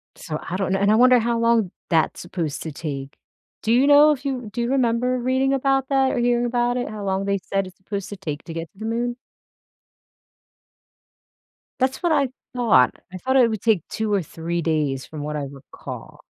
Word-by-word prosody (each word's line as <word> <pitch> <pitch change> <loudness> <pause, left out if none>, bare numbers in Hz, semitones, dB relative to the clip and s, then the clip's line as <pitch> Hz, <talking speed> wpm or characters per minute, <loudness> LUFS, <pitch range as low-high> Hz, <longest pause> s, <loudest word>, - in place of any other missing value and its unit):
So 155 -2 -5
I 180 - -2
don't 195 -1 -1
know 195 - +1
and 200 +1 +3
I - - +5
wonder 250 +2 +6
how 235 +1 0
long 230 -5 +2 0.2
that's 160 -2 +1
supposed 170 -4 -4
to 160 - -5
take. 140 -2 -6 0.5
Do 220 - 0
you 260 +4 +4
know 290 +1 +7
if 280 -1 -3
you 255 -5 -3
do 240 - -2
you 235 - -1
remember 250 -1 +1
reading 260 +2 +1
about 270 0 +1
that 270 -1 +3
or - - -2
hearing 240 0 +2
about 240 0 +1
it 245 - -2
how 210 -1 -6
long 195 0 -1
they 200 0 +1
said 195 -1 -1
it's 185 - -14
supposed 200 0 -5
to 205 - -7
take 150 -6 -5
to 165 - -7
get 165 -1 -6
to 195 - -23
the 220 - -5
Moon? 240 +2 -1 2.6
That's 260 +5 0
what 345 - +2
I 285 -3 +3 0.3
thought. 225 - +4 0.2
I - - -5
thought 260 +8 +1
it 245 -3 +5
would 220 -3 -3
take 220 -6 +3
2 220 -1 -2
or 200 - +2
3 170 +1 -4
days 150 -5 0
from 155 -2 -8
what 150 0 -3
I 145 - -3
recall. 135 -1 -10
220 Hz, 215 wpm, -23 LUFS, 170-250 Hz, 2.6 s, know